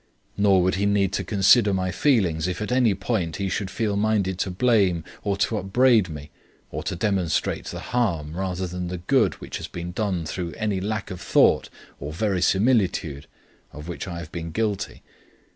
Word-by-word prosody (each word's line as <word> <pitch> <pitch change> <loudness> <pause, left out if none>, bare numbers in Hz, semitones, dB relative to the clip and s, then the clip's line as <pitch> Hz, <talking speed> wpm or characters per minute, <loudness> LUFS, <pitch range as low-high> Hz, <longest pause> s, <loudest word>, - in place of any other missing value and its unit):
Nor 100 -3 +4
would 95 - +2
he 100 - +2
need 100 -2 +2
to 100 - -1
consider 100 +2 +4
my 95 0 -1
feelings 90 - +2
if 90 - -3
at 105 +3 -3
any 125 -5 +3
point 95 -5 -2
he 100 -1 -2
should 95 0 -2
feel 105 -1 -1
minded 100 -3 +1
to 95 - 0
blame 95 -4 +2 0.2
or 100 -1 0
to 110 +2 0
upbraid 110 0 +3
me, 75 -1 -8 0.4
or - - -4
to - - -3
demonstrate 90 -3 0
the - - -6
harm 85 -11 -1
rather 95 0 -2
than 90 0 -4
the 90 +1 -4
good 85 - +2
which - - -7
has - - -6
been 85 0 -6
done 90 -3 -2
through 85 +2 -4
any 105 -4 -1
lack 105 0 -3
of 90 - -7
thought - - +3 0.3
or 70 +2 -5
verisimilitude 95 - +1 0.4
of 75 +3 -10
which 90 +2 -5
I 85 -2 -5
have 85 -2 -8
been 85 -1 -5
guilty. 100 +1 -2
95 Hz, 185 wpm, -24 LUFS, 85-105 Hz, 0.4 s, Nor